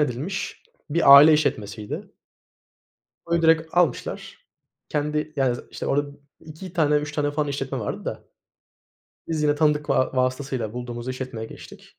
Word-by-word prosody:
edilmiş 150 Hz, +7 st, -3 dB, 0.3 s
bir 145 Hz, -3 st, +7 dB
aile 150 Hz, +3 st, +9 dB
işletmesiydi. 105 Hz, -8 st, -2 dB, 1.1 s
Onu 170 Hz, 0 st, +1 dB
direkt 160 Hz, 0 st, +3 dB
almışlar. 170 Hz, -8 st, 0 dB, 0.5 s
Kendi 150 Hz, +1 st, -2 dB
yani, 130 Hz, -3 st, +1 dB
zı -, -, -11 dB
işte, -, -, -6 dB
orada 145 Hz, +1 st, 0 dB, 0.3 s
2 160 Hz, +4 st, -11 dB
tane, 150 Hz, -4 st, +2 dB
3 150 Hz, 0 st, -3 dB
tane 145 Hz, -1 st, -1 dB
falan 150 Hz, 0 st, -1 dB
işletme 135 Hz, -2 st, -3 dB
vardı 105 Hz, -, -5 dB
da -, -, -5 dB, 1.1 s
biz 155 Hz, -2 st, -1 dB
yine 145 Hz, -1 st, +3 dB
tanıdık 150 Hz, -1 st, +1 dB
va 130 Hz, 0 st, +1 dB
vasıtasıyla 130 Hz, -3 st, -1 dB
bulduğumuz 120 Hz, 0 st, -6 dB
işletmeye 130 Hz, -3 st, -5 dB
geçtik. -, -, -14 dB
145 Hz, 140 wpm, -24 LUFS, 130-155 Hz, 1.1 s, aile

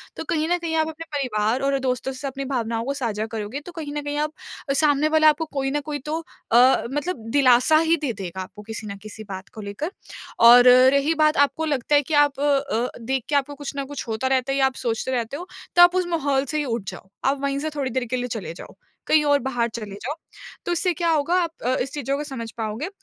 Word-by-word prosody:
तो -, -, -5 dB
कहीं 315 Hz, -1 st, +1 dB
न 355 Hz, -, +3 dB
कहीं 335 Hz, -2 st, -3 dB
आप 315 Hz, 0 st, +2 dB
अपने 320 Hz, +1 st, -8 dB
परिवार 245 Hz, -3 st, 0 dB
और 275 Hz, -, +1 dB
दोस्तों 255 Hz, 0 st, -2 dB
से 260 Hz, +2 st, -5 dB
अपनी 275 Hz, 0 st, -5 dB
भावनाओं 230 Hz, -4 st, -2 dB
को 275 Hz, -, -1 dB
साझा 225 Hz, -6 st, -2 dB
करोगे 220 Hz, +4 st, -4 dB
तो 355 Hz, -, -8 dB
कहीं 295 Hz, -3 st, -5 dB
न -, -, -1 dB
कहीं 290 Hz, 0 st, -3 dB
आप 305 Hz, -, -7 dB, 0.4 s
सामने 295 Hz, 0 st, +3 dB
वाला 310 Hz, 0 st, +7 dB
आपको 305 Hz, +2 st, 0 dB
कोई 270 Hz, -1 st, -1 dB
न 295 Hz, -, 0 dB
कोई 290 Hz, -1 st, -2 dB
तो 315 Hz, +2 st, -1 dB, 0.3 s
अ, 245 Hz, +3 st, +5 dB
मतलब 290 Hz, -5 st, -3 dB
दिलासा 260 Hz, +2 st, +5 dB
ही 335 Hz, -, +6 dB
दे 285 Hz, -5 st, -1 dB
देगा 190 Hz, -2 st, -6 dB
आपको 185 Hz, +2 st, -10 dB
किसी 220 Hz, 0 st, -7 dB
न 200 Hz, -1 st, -6 dB
किसी 215 Hz, +1 st, -9 dB
बात 190 Hz, 0 st, -7 dB
को 220 Hz, -, -8 dB
लेकर। 205 Hz, -, -5 dB, 0.6 s
और 245 Hz, +1 st, +9 dB, 0.2 s
रही 280 Hz, +3 st, +2 dB
बात 305 Hz, 0 st, +3 dB
आपको 320 Hz, +3 st, -5 dB
लगता 290 Hz, -1 st, +1 dB
है 290 Hz, -, +5 dB
कि 310 Hz, -, -5 dB
आप 290 Hz, -2 st, +3 dB
अ, 275 Hz, -4 st, +1 dB
देख 260 Hz, +2 st, -1 dB
के 295 Hz, -, +1 dB
आपको 285 Hz, +1 st, 0 dB
कुछ 290 Hz, 0 st, -6 dB
न 275 Hz, -, -2 dB
कुछ 280 Hz, -2 st, -7 dB
होता 225 Hz, +4 st, -1 dB
रहता 265 Hz, 0 st, +1 dB
है -, -, -1 dB
या 270 Hz, -, +5 dB
आप 265 Hz, -1 st, 0 dB
सोचते 230 Hz, +2 st, -1 dB
रहते 245 Hz, +1 st, -2 dB
हो 355 Hz, +3 st, -8 dB, 0.3 s
तो 350 Hz, -, +7 dB
आप 350 Hz, +1 st, +7 dB
उस 365 Hz, -1 st, +1 dB
माहौल 285 Hz, -5 st, 0 dB
से 305 Hz, +3 st, -3 dB
ही 300 Hz, -, 0 dB
उठ 230 Hz, -4 st, -2 dB
जाओ। 185 Hz, +1 st, -12 dB, 0.2 s
आप 275 Hz, +1 st, +2 dB
वहीं 280 Hz, 0 st, -1 dB
से 310 Hz, +2 st, -2 dB
थोड़ी 275 Hz, -3 st, -1 dB
देर 255 Hz, +1 st, -1 dB
के 245 Hz, +2 st, -3 dB
लिए 245 Hz, -, -2 dB
चले 200 Hz, -9 st, -4 dB
जाओ, -, -, -11 dB, 0.3 s
कहीं 310 Hz, -1 st, +4 dB
और 285 Hz, 0 st, +4 dB
बाहर 245 Hz, -3 st, -1 dB
चले 210 Hz, -4 st, -6 dB
जाओ। 260 Hz, +9 st, -5 dB, 0.5 s
तो -, -, -1 dB
इससे 350 Hz, +1 st, +1 dB
क्या 340 Hz, +1 st, -1 dB
होगा? 315 Hz, +2 st, +1 dB
आप 335 Hz, -, -3 dB
अ, 255 Hz, +1 st, +2 dB
इस 270 Hz, -, -3 dB
चीज़ों 275 Hz, -1 st, -2 dB
को 295 Hz, -, -3 dB
समझ 235 Hz, -6 st, -6 dB
पाओगे। 225 Hz, -, -3 dB
275 Hz, 250 wpm, -23 LUFS, 235-295 Hz, 0.6 s, और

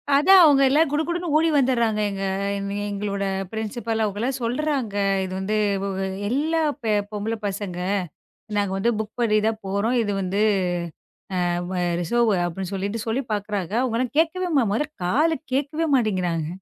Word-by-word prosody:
அதான், 370 Hz, +6 st, +7 dB
அவங்க 285 Hz, -3 st, +6 dB
எல்லாம் 300 Hz, +2 st, +3 dB
குடுகுடுன்னு 340 Hz, +2 st, -1 dB
ஓடி 325 Hz, +1 st, +3 dB
வந்தர்றாங்கங்க. 220 Hz, -7 st, +1 dB, 0.4 s
எங்க 200 Hz, 0 st, -4 dB, 0.2 s
எங்களோட 200 Hz, 0 st, -3 dB, 0.3 s
ப்ரின்ஸிபல் 220 Hz, 0 st, -2 dB
அவங்களாம் 235 Hz, +6 st, -2 dB
சொல்றாங்க, 255 Hz, -3 st, -1 dB, 0.3 s
இது 185 Hz, 0 st, -5 dB
வந்து 210 Hz, +3 st, -1 dB, 0.7 s
எல்லா 315 Hz, +5 st, +1 dB, 0.2 s
பெ 220 Hz, -2 st, +1 dB, 0.2 s
பொம்பள 210 Hz, +2 st, -2 dB
பசங்க, 190 Hz, -3 st, -4 dB, 0.8 s
நாங்க 200 Hz, -2 st, 0 dB
வந்து 235 Hz, +5 st, +2 dB
புக் 220 Hz, +1 st, -5 dB
பண்ணி 215 Hz, -2 st, +3 dB
தான் 220 Hz, 0 st, -2 dB
போறோம். 200 Hz, +6 st, 0 dB
இது 205 Hz, -2 st, -1 dB
வந்து 195 Hz, +2 st, -1 dB, 1.1 s
அ -, -, 0 dB, 0.2 s
வ -, -, -3 dB, 0.3 s
ரிசெர்வ் 235 Hz, +4 st, +2 dB
அப்படின்னு 185 Hz, +2 st, -5 dB
சொல்லிட்டு 200 Hz, +3 st, -3 dB
சொல்லிப் 235 Hz, +1 st, -2 dB
பாக்குறாங்க. 205 Hz, -3 st, -3 dB
அவங்கலாம் 250 Hz, +1 st, -1 dB
கேக்கவே 355 Hz, +2 st, +1 dB
மா 250 Hz, -, +4 dB
மொதல்ல 295 Hz, +7 st, -1 dB
காதுல 305 Hz, -, +2 dB, 0.2 s
கேக்கவே 295 Hz, +4 st, 0 dB
மாட்டேங்கறாங்க. 180 Hz, -9 st, 0 dB
225 Hz, 140 wpm, -23 LUFS, 200-275 Hz, 1.1 s, அதான்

